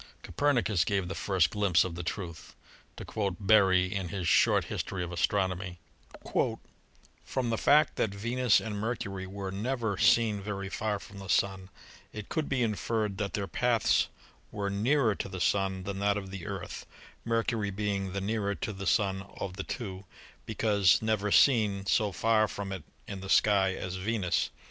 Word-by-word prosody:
Copernicus 120 - +1
gave 95 -1 -1
the 95 - -4
first 95 -3 +1
glimpse 100 -6 +3
of 95 - -4
the 85 - -5
truth. 85 -1 -6 0.4
To - - -7
quote 100 -4 -2
Berry 95 -3 +4
in 95 -2 -2
his 90 -1 -3
"Short - - +4
History 95 -2 -3
of 85 - -5
Astronomy": 90 +1 -1 1.5
"From 125 -3 -2
the 115 - 0
fact 150 0 +4
that 110 - +1
Venus 120 +4 +2
and 105 -2 -5
Mercury 100 -4 -3
were 95 0 -5
never 110 0 -2
seen 115 -3 +4
very 100 -1 -4
far 105 +1 -2
from 100 0 -12
the 95 - -8
Sun, 95 0 0 0.4
it 105 -1 -8
could 155 -2 -2
be 130 -3 +1
inferred 110 -2 -1
that 100 -1 -2
their 100 - -1
paths 120 +1 +2 0.4
were 100 -1 -3
nearer 115 +3 +2
to 100 - -5
the 95 -1 -6
Sun 95 0 0
than 100 0 -4
that 100 0 +2
of 95 -2 -6
the 95 -3 -7
Earth, - - -6 0.4
Mercury 115 -2 0
being 100 -1 -2
the 100 - -2
nearer 100 0 -1
to 105 - -4
the 95 0 -6
Sun 95 -3 +2 0.2
of 90 -2 -4
the 95 - -4
two, 95 -5 -6 0.4
because 100 -4 +3
never 110 -2 0
seen 105 -8 +4
so 105 +1 +2
far 110 +4 +2
from 100 -1 -6
it 95 -2 -4 0.3
in 100 - -6
the 95 - -8
sky 95 -3 +4
as 95 0 -5
Venus. 100 -2 0
100 Hz, 170 wpm, -29 LUFS, 95-110 Hz, 1.5 s, Berry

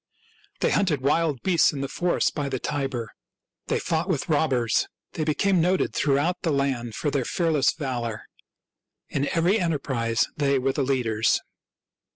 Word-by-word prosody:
They - - +2
hunted 165 -9 +1
wild 150 0 +1
beasts 180 -4 +4
in 140 - -5
the 135 - -2
forest 175 +5 0
by 145 -2 -2
the 130 - -2
Tiber; 135 -4 -3 0.6
they - - +1
fought 165 +3 -1
with 165 -2 -1
robbers; 135 -7 +2 0.2
they 160 - -3
became 175 +4 +2
noted 180 +3 +1
throughout 150 +5 +1
the 165 - -1
land 135 -6 -1
for 145 - -1
their 140 -2 0
fearless 155 -1 +2
valor. 120 -7 -4 0.9
In 140 0 -1
every 175 +6 +2
enterprise 135 - 0
they 140 -2 +2
were 135 +1 0
the 145 - -1
leaders. 120 -5 +1
140 Hz, 155 wpm, -25 LUFS, 130-165 Hz, 0.9 s, beasts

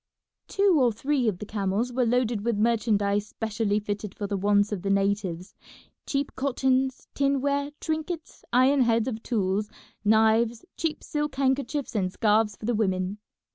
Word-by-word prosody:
Two 395 -4 +3
or 250 -3 +4
three 260 +3 0
of 205 -5 0
the 210 - -7
camels 210 +4 -1
were 250 -1 +1
loaded 235 -3 +1
with 235 -2 0
merchandise 210 -2 +1
specially 215 -1 -1
fitted 205 -1 -5
for 205 - -4
the 200 0 -2
wants 205 +1 +2
of 200 -4 -3
the 195 - -2
natives: 195 -2 0 0.5
cheap 280 0 -2
cottons, 265 -1 0
tinware, 280 +1 +1
trinkets, 315 +1 -4
iron 260 +3 +4
heads 230 -1 +2
of 225 -3 -3
tools, 210 -3 -1 0.3
knives, 220 +3 +3
cheap 320 -2 -3
silk 295 -2 -3
handkerchiefs 275 +1 0
and 190 -4 0
scarves 210 0 +2
for 210 - -9
the 240 - +1
women. 190 -2 -1
225 Hz, 155 wpm, -26 LUFS, 205-265 Hz, 0.5 s, or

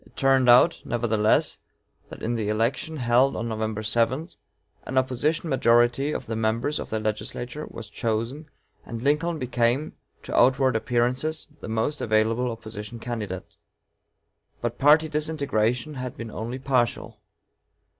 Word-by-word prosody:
It - - -23
turned 135 -2 +3
out, 125 +8 +6
nevertheless, 110 -3 +1 0.5
that - - -10
in 115 - 0
the 110 -3 -1
election 115 +8 -1
held 125 +1 +3
on 115 - -3
November 110 -1 -3
7, 120 - +1 0.6
an 130 - -3
opposition 130 +6 +1
majority 120 +1 +3
of - - -4
members 115 +6 -1
of - - -6
the 110 - -1
legislature 120 +6 -4
was 115 -2 -8
chosen, 115 +7 -3 0.3
and 115 0 -7
Lincoln 155 +4 +1
became, 125 +1 0 0.3
to - - -5
outward 130 -1 +4
appearances, 125 +8 0
the - - -8
most 115 +7 -1
available 110 +3 +1
opposition 110 -1 -7
candidate. 110 -6 -5 1.1
But 120 0 -3
party 150 +3 +6
disintegration 150 -4 -1
had 125 -2 -6
been 115 -1 -6
only 115 +4 -4
partial. 130 -4 -1
120 Hz, 135 wpm, -25 LUFS, 110-135 Hz, 1.1 s, out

